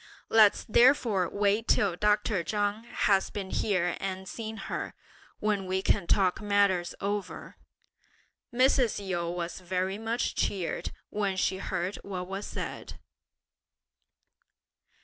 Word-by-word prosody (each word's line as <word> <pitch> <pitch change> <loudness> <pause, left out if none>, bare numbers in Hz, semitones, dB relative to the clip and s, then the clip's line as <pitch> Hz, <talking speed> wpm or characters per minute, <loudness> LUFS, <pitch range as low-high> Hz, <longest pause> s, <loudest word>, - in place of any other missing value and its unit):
Let's 215 -2 +5
therefore 230 - +4
wait 205 +2 +1
till 195 -4 +3
Dr. 210 -1 +1
Chang 205 +3 -1
has 195 -4 +1
been 195 -2 -6
here 180 -4 0
and 190 0 -4
seen 220 +3 -6
her, - - -4 0.4
when 205 -3 0
we 190 +1 -1
can 195 -5 +1
talk 190 -1 +2
matters 200 -4 +2
over!" 200 0 -4 0.9
Mrs. 255 -1 +3
Yu 175 -3 -2
was 175 0 -4
very 185 +2 -2
much 230 +2 -1
cheered 185 -4 -2 0.2
when 200 -2 -1
she 190 0 0
heard 185 +1 -3
what 185 -2 -6
was 195 +2 -5
said. - - -6
200 Hz, 120 wpm, -29 LUFS, 185-210 Hz, 0.9 s, Let's